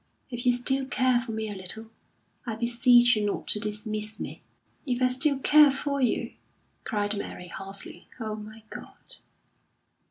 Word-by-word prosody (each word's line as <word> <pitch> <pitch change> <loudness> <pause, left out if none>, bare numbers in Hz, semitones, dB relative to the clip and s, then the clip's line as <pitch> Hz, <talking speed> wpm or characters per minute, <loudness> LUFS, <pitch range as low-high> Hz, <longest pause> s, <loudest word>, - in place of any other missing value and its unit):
If 240 +1 -2
you - - +7
still 265 +2 0
care 255 -2 +2
for 245 - -6
me 220 0 -3
a 210 - -4
little, 210 +4 -7 0.6
I 225 - -2
beseech 240 +1 +5
you 215 - -1
not 205 - -2
to 210 - +2
dismiss 215 0 -3
me." - - -6 0.4
"If 250 -4 -2
I 255 0 +3
still 275 +3 +2
care 295 +2 +6
for 280 +1 -1
you!" 250 - 0 0.5
cried 210 -1 -1
Mary, 180 -3 -6
hoarsely. 195 +2 -6
"Oh, 215 -2 -3
my 215 +1 -11
God!" - - -12
230 Hz, 160 wpm, -27 LUFS, 215-255 Hz, 0.6 s, you